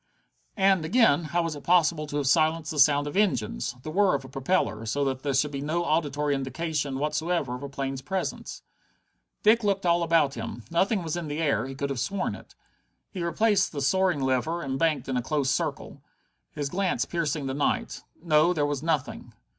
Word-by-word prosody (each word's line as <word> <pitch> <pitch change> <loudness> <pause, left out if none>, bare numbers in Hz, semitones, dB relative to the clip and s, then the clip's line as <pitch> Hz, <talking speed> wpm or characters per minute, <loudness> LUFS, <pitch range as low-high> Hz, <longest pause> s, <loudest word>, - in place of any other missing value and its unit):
And, 190 -3 +3
again, 175 - +3
how 170 +2 0
was 165 -2 -3
it 145 - -10
possible 170 -3 +2
to 145 - -4
have 145 - -1
silenced 160 +2 +2
the 150 - -3
sound 145 0 +5
of 145 - -5
engines, 120 - 0
the 155 - -5
whir 195 -1 +3
of 135 -1 -4
a - - -11
propeller, 130 - -1
so 140 +5 0
that 130 -1 -2
there 140 -1 -1
should 145 +2 +1
be 140 -1 -4
no 165 +4 -1
auditory 150 -2 0
indication 140 +1 -2
whatever 150 -1 -1
of 125 - -6
a 140 - -6
plane's 135 -1 -4
presence? 185 +8 -4 0.8
Dick 225 +2 +5
looked 195 -2 0
all 170 0 +3
about 165 -4 +2
him. 115 0 -6
Nothing 190 +3 +1
was 160 -1 -3
in 175 -2 -4
the 150 +1 -4
air 145 -4 +1
he 135 - -7
could 140 +1 -3
have 135 - -3
sworn 185 +10 -2
it. - - -13 0.6
He 185 - -5
replaced 205 +5 +2
the 145 - -3
soaring 180 +1 +2
lever 130 +6 0
and 135 -1 -3
banked 160 -2 +1
in 130 -1 -1
a - - +1
close 140 +1 0
circle, 145 -3 -3 0.5
his 145 -2 -4
glance 185 +3 0
piercing 155 -4 -2
the 135 - -2
night. 145 +1 -1 0.2
No, 160 +1 +4
there 150 -4 0
was 145 -2 -2
nothing. 155 -4 -2
150 Hz, 200 wpm, -26 LUFS, 140-170 Hz, 0.8 s, sound